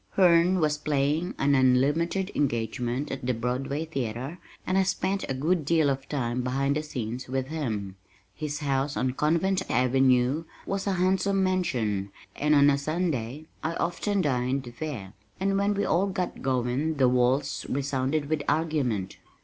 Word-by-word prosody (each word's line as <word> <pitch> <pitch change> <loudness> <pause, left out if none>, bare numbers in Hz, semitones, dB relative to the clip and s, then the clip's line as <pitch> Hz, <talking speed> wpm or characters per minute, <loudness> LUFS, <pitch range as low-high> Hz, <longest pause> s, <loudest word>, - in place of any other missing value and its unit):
Herne 180 0 +5
was 150 -2 +1
playing 150 +4 0
an 140 +1 +2
unlimited 145 +9 +2
engagement 120 +1 -1
at 135 - -5
the 125 0 0
Broadway 130 +6 -2
theater 135 +2 -4 0.3
and 185 - 0
I 195 - +5
spent 190 +1 -1
a 135 - -1
good 160 +5 +1
deal 155 -1 +3
of 135 0 -5
time 125 -3 -1
behind 135 +3 0
the 155 - 0
scenes 125 -4 -5
with 130 +1 -2
him. 110 -11 -3 0.4
His 150 -1 -4
house 140 0 0
on 130 0 +1
Convent 170 +7 +1
Avenue 130 +4 +3 0.2
was 195 0 -2
a 195 - +2
handsome 190 +2 +2
mansion 115 - 0 0.2
and 150 +1 +2
on 145 0 +6
a 140 - +1
Sunday, 150 -3 -2 0.2
I 165 +1 -1
often 195 +4 0
dined 130 -3 -1
there, 120 -12 -5 0.3
and 195 +1 +1
when 200 +1 +1
we 200 0 0
all 180 +5 +2
got 185 -2 -3
going 130 +4 0
the 135 -3 +4
walls 125 +3 +1
resounded 140 +2 -1
with 155 0 0
argument. 145 - 0
140 Hz, 155 wpm, -27 LUFS, 125-165 Hz, 0.4 s, on